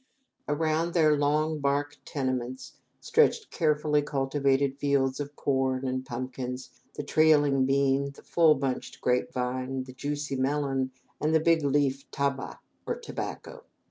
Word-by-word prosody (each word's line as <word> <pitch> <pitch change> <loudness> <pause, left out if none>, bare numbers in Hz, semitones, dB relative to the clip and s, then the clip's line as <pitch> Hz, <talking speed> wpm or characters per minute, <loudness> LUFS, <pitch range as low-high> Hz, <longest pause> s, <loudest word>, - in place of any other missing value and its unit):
Around 160 +3 0
their 155 -3 +5
long 150 +2 +1
bark 145 +1 0
tenements, 130 -2 -3 0.3
stretched 455 -2 +2
carefully 150 -2 +2
cultivated 140 -1 0
fields 135 -2 +1
of 145 0 -5
corn 130 -1 0
and 130 0 -2
pumpkins, 125 +1 -5 0.2
the - - -4
trailing 145 -3 +4
bean, 140 0 +2
the 140 - -14
full 160 -3 +4
bunched 135 -2 -3
grapevine, 130 +1 -1
the 130 0 -11
juicy 145 +1 -3
melon, 135 -1 0 0.3
and 155 +1 +2
the - - +6
big 165 0 +3
leafed 140 -1 0
tabah, 140 -1 -2 0.3
or - - 0
tobacco. 480 0 -7
140 Hz, 130 wpm, -28 LUFS, 130-150 Hz, 0.3 s, the